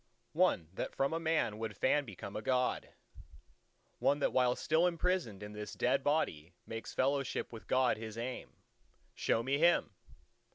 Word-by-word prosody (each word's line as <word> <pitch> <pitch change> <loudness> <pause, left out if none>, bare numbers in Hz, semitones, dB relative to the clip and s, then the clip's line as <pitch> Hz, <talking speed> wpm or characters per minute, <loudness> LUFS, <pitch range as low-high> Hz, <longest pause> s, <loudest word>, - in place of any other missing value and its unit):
one 80 - +2
that - - -4
from 135 +3 +1
a 165 - 0
man 160 -10 0
would 110 -3 -4
fain 145 +2 +2
become 100 -2 -8
a 105 - -3
God; 125 +2 0 1.1
one 145 - +3
that 145 - 0
while 125 -1 +3
still 160 +3 +2
imprisoned 170 - -1
in 105 0 -8
this 105 0 -6
dead 125 +2 +1
body 90 - 0
makes 115 0 -6
fellowship 135 -1 0
with 115 - -10
God 130 -2 +3
his 110 0 -7
aim. 125 +2 -4 0.6
Show 115 - +1
me 135 +3 0
him! 170 -7 +4
125 Hz, 160 wpm, -34 LUFS, 110-145 Hz, 1.1 s, him